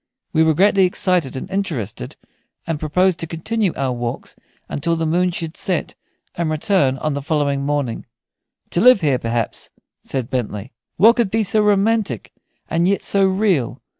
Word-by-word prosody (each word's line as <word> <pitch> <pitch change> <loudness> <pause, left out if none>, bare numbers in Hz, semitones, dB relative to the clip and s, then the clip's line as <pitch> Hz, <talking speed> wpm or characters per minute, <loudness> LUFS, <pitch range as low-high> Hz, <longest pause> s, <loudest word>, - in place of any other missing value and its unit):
We 160 - +3
were 160 -1 +3
greatly 195 +2 +4
excited 180 -5 0
and 130 - -5
interested, 140 - -3 0.5
and 165 -3 -3
proposed 180 +4 +1
to 165 - -4
continue 195 +5 -1
our 135 -2 -1
walks 120 -1 -5 0.3
until 165 +4 -1
the 165 0 -1
moon 175 +3 +2
should 165 -2 -5
set, 180 -4 -2 0.4
and 170 -1 -2
to - - -1
return 155 -4 +1
on 155 +2 -2
the 140 - -3
following 140 -2 0
morning 140 -5 -2 0.6
"to 175 - +1
live 250 -4 +7
here, 140 -5 +2
perhaps," 115 -1 -2 0.3
said 130 -1 -4
Bentley. 110 -2 -3 0.3
"What 225 +6 +6
could 235 -5 +2
be 220 +2 +1
so 215 +2 +2
romantic 205 - +1 0.4
and 170 +2 +1
yet 200 +1 +1
so 195 -1 +3
real? 190 - 0
165 Hz, 165 wpm, -20 LUFS, 140-195 Hz, 0.6 s, live